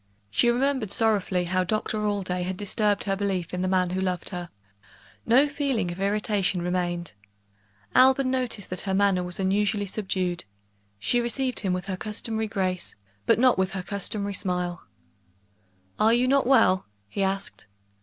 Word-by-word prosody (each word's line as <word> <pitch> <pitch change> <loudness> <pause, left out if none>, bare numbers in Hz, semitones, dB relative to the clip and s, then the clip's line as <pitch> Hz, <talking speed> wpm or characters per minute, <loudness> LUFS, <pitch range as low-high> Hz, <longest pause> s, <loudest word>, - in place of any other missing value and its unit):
She 240 - +3
remembered 255 -2 +1
sorrowfully 200 -5 +1
how 185 +1 +1
Doctor 215 +3 -1
Allday 185 -3 -1
had 180 +1 -3
disturbed 205 0 0
her 195 -1 0
belief 190 -4 -2
in 180 - -2
the 185 - 0
man 185 -1 +1
who 190 +1 -1
loved 180 -2 -1
her; 175 -2 -6 0.8
no 260 +6 +5
feeling 280 -10 -1
of 175 - -8
irritation 200 -2 0
remained. 175 -2 -2 0.8
Alban 260 0 +5
noticed 245 -7 -1
that 185 - -2
her 190 - +1
manner 195 -2 +3
was 180 +1 -4
unusually 200 +1 +1
subdued; 185 -3 -2 0.5
she 240 - +1
received 255 +2 0
him 195 -4 -1
with 180 0 -2
her 190 -2 -4
customary 220 +2 -3
grace, 185 -4 -2 0.3
but - - +5
not 250 -4 +4
with 190 0 0
her 190 -1 -4
customary 200 +1 -3
smile. 180 - -3 1.1
"Are 225 +2 +5
you 245 +1 +2
not 275 -1 +3
well?" 205 - +4 0.2
he 150 - -4
asked. 195 - -2
195 Hz, 160 wpm, -26 LUFS, 180-225 Hz, 1.1 s, no